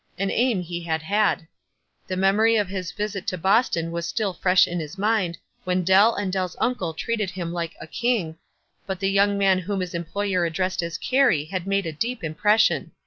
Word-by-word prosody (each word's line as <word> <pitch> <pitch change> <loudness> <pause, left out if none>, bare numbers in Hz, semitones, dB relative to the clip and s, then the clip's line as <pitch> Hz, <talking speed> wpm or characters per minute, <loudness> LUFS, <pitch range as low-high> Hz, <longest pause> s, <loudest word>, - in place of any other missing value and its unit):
An 195 0 -1
aim 240 -6 +1
he 175 0 -5
had 160 -1 -2
had. 200 -2 +1 0.6
The 185 - -3
memory 205 +4 +3
of 205 -4 +1
his 185 -3 -4
visit 205 +1 -4
to 185 - -1
Boston 190 -3 +2
was 170 0 -3
still 205 +1 -1
fresh 185 +1 +4
in 175 0 -3
his 155 +3 -7
mind, 200 -4 0 0.3
when 180 0 0
Dell 195 +6 +5
and 195 -2 -2
Dell's 185 -3 -2
uncle 185 -10 -1
treated 215 +2 -2
him 175 -2 -5
like 170 -1 -4
a - - -8
"king," 175 -4 -1 0.5
but 190 -2 -3
the 195 0 0
young 200 +1 +3
man 195 -2 +3
whom 195 +2 -3
his 180 -2 -4
employer 180 +2 -1
addressed 185 +2 -1
as 170 -1 -4
Carey 250 - +2
had 185 +2 -5
made 195 -1 +1
a 165 - -2
deep 230 +7 -3
impression. 210 +8 +2
190 Hz, 195 wpm, -24 LUFS, 170-205 Hz, 0.6 s, Dell